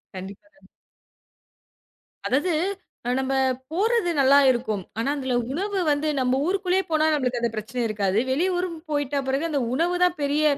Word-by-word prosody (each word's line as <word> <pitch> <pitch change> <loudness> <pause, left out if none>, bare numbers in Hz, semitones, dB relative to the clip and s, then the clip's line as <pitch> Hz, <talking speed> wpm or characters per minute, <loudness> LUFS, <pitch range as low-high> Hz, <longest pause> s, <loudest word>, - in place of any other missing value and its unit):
கண்டிப்பாங்க. 200 +7 -11 1.6
அதாவது, 305 +7 +1 0.7
நம்ம 265 0 -1 0.4
போறது 420 +1 +1
நல்லா 275 +2 +6
இருக்கும். 220 -5 -2 0.2
ஆனா, 235 - 0
அதுல 260 -2 -1 0.2
உணவு 390 +5 -2
வந்து 290 +2 0
நம்ம 255 +1 +1
ஊருக்குள்ளே 380 0 +1
போனா 310 0 +3
நம்மளுக்கு 250 -4 0
அந்த 235 -1 0
பிரச்சனை 230 +3 -4
இருக்காது. 205 -2 0
வெளியூருன்னு 355 +2 0
போயிட்ட 290 -1 0
பெறகு 270 +5 0
அந்த 290 -3 0 0.2
உணவு 345 +4 +1
தான் 355 -2 0
பெரிய 290 +2 +1
285 Hz, 135 wpm, -24 LUFS, 250-350 Hz, 1.6 s, நல்லா